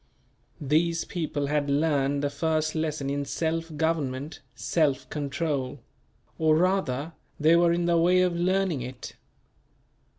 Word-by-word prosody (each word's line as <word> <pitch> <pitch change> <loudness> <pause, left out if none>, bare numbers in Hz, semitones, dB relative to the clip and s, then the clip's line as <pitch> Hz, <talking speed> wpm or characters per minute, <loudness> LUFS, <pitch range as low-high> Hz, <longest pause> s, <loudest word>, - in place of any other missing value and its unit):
These 160 +4 +1
people 155 -5 -3
had 145 0 0
learned 140 -1 +1
the 145 - 0
first 155 +1 0
lesson 155 -3 -2
in 140 0 -1
self 165 +2 -3
government 150 -3 -1 0.2
self 140 -5 0
control; 140 -2 -2 0.6
or 155 -1 +4
rather, 165 -5 0 0.3
they 155 +2 +5
were 170 0 +4
in 170 0 0
the 170 -1 +3
way 180 +2 +4
of 180 -1 +1
learning 180 -3 +1
it. 125 +1 -7
155 Hz, 130 wpm, -27 LUFS, 140-170 Hz, 0.6 s, they